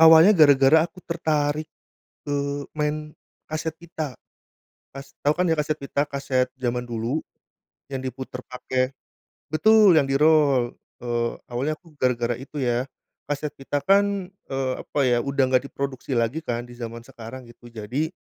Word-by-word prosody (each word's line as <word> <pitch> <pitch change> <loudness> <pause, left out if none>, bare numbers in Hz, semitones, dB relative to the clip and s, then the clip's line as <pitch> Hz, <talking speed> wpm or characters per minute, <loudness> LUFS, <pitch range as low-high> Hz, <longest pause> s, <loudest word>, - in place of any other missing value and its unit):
Awalnya 160 +5 +9
gara-gara 150 -1 +6
aku 185 - -19
tertarik, 155 -2 0 0.6
eee, 140 0 -1
main 150 0 -2 0.3
kaset 155 0 -3
pita. 160 -6 -6 0.8
Kas 135 0 -9
tahu 145 +1 +2
kan 180 - +1
ya, 160 - +4
kaset 150 0 0
pita, 140 +1 -1
kaset 140 -2 0
zaman 125 -1 -2
dulu 120 +6 -1 0.7
yang 135 -1 -3
diputar 130 -1 -6
pakai 130 0 -1 0.6
betul, 210 +3 +6
yang 140 - +1
di 135 - 0
rol. 145 -5 +4 0.3
Eee, 120 -1 0 0.2
awalnya 135 +6 -1
aku 165 0 -21
gara-gara 120 -2 +1
itu 140 +3 -12
ya, 120 +2 0 0.4
kaset 145 0 -2
pita 140 +1 -3
kan, 200 0 +2
eee, 135 -8 -3
apa 145 - -4
ya, 120 -2 +3
udah 140 0 +1
gak 125 - -5
diproduksi 135 -1 -4
lagi 115 +6 +1
kan 120 -4 -2
di - - -13
zaman 115 -1 -6
sekarang 125 0 -10
gitu. 120 0 -16
Jadi 115 +8 -2
140 Hz, 150 wpm, -24 LUFS, 125-155 Hz, 0.8 s, Awalnya